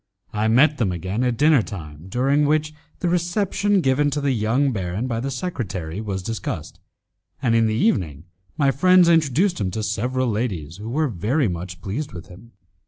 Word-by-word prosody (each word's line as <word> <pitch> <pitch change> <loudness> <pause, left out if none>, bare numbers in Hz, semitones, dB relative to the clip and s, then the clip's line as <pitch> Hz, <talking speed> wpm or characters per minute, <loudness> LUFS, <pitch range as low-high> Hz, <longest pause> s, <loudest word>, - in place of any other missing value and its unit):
I 105 +1 0
met 140 +7 +4
them 105 -6 +1
again 95 +7 -2
at 125 -2 0
dinner 150 -2 +5
time, 80 -5 -9
during 135 +6 +2
which 155 0 +1 0.3
the 180 - 0
reception 195 +3 +1
given 145 +1 +2
to 145 +1 -2
the 140 -1 0
young 125 +4 +1
baron 95 +1 -3
by 115 -3 -2
the 135 +4 -3
secretary 110 - -4
was 95 -4 -4
discussed, 95 -7 -5 0.6
and 120 -3 +1
in 115 -1 +4
the 110 - 0
evening 85 - 0 0.3
my 140 -2 +3
friends 180 +5 +5
introduced 165 - +2
him 95 - 0
to 110 +4 -4
several 125 +5 -1
ladies 100 -8 -3
who 105 +2 -7
were 150 +2 0 0.4
much 85 0 -6
pleased 135 +10 -4
with 85 -1 -9
him. 105 +7 -15
120 Hz, 175 wpm, -22 LUFS, 95-145 Hz, 0.6 s, dinner